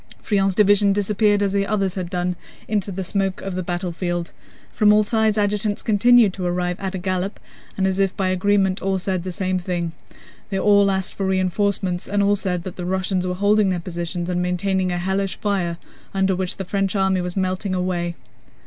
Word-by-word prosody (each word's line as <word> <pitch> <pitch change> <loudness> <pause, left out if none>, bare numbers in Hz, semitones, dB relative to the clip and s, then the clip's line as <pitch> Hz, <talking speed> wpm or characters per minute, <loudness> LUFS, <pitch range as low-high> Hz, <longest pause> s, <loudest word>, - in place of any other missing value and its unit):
Friant's 195 -3 +1
division 205 -1 +4
disappeared 205 0 +2
as 200 -1 0
the 200 0 +1
others 195 -4 0
had 185 -3 -4
done 180 -1 -1 0.3
into 205 -2 0
the 190 +1 -4
smoke 195 0 -1
of 195 - -4
the 185 - -2
battlefield. 175 -1 -3 0.4
From 210 -1 +4
all 210 0 +5
sides 220 0 +1
adjutants 210 0 0
continued 225 -1 +5
to 190 - -6
arrive 180 0 -1
at 195 -1 -4
a - - -1
gallop 185 +2 -2 0.4
and 190 - +1
as 190 0 0
if 195 -1 +1
by 190 -1 +1
agreement 190 0 +1
all 195 0 0
said 185 -1 -1
the 185 +1 -5
same 185 +1 -1
thing. 175 -2 -2 0.6
They 195 - -2
all 200 0 +4
asked 190 -1 -1
for 195 - -2
reinforcements 185 -1 0
and 205 0 +1
all 200 +1 +3
said 180 -3 -2
that 185 - -7
the 180 - -4
Russians 185 0 -1
were 180 - -2
holding 205 +1 +3
their 180 -2 0
positions 175 0 -4
and 180 -1 -1
maintaining 185 +1 0
a 175 - -1
hellish 190 +2 -1
fire 185 -5 -1 0.4
under 190 -1 +2
which 185 0 -3
the 195 - -4
French 195 +2 -1
army 190 -1 +2
was 180 +1 -4
melting 185 +1 -1
away. 175 -2 -1
190 Hz, 200 wpm, -22 LUFS, 180-200 Hz, 0.6 s, all